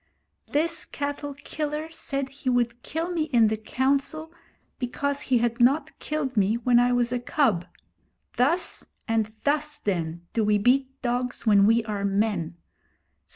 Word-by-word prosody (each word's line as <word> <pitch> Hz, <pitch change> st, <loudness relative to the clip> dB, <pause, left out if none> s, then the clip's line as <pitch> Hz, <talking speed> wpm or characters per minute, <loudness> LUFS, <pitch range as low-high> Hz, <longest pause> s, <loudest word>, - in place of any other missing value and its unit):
'This 330 Hz, +3 st, 0 dB
cattle 285 Hz, 0 st, -4 dB
killer 300 Hz, +1 st, -4 dB
said 275 Hz, -4 st, -3 dB
he 275 Hz, -1 st, -4 dB
would 240 Hz, -1 st, +1 dB
kill 330 Hz, +6 st, -3 dB
me 330 Hz, -3 st, 0 dB
in 235 Hz, -8 st, +4 dB
the 220 Hz, -, 0 dB
Council 275 Hz, +8 st, -1 dB, 0.5 s
because 280 Hz, +3 st, -1 dB
he 260 Hz, -4 st, +2 dB
had 235 Hz, 0 st, 0 dB
not 270 Hz, +6 st, +2 dB
killed 295 Hz, -4 st, -2 dB
me 205 Hz, +1 st, +3 dB
when 240 Hz, 0 st, +4 dB
I 245 Hz, 0 st, +3 dB
was 245 Hz, -1 st, +2 dB
a 250 Hz, -, 0 dB
cub. 235 Hz, -, +1 dB, 0.7 s
Thus 315 Hz, +9 st, +1 dB, 0.2 s
and 225 Hz, -2 st, 0 dB
thus, 295 Hz, +1 st, 0 dB
then, 170 Hz, -, -3 dB
do 225 Hz, -, +1 dB
we 210 Hz, 0 st, +3 dB
beat 265 Hz, +5 st, +2 dB
dogs 245 Hz, 0 st, -1 dB
when 200 Hz, -2 st, +6 dB
we 225 Hz, +1 st, +3 dB
are 205 Hz, -2 st, -3 dB
men. 195 Hz, -4 st, 0 dB
250 Hz, 155 wpm, -26 LUFS, 220-285 Hz, 0.7 s, when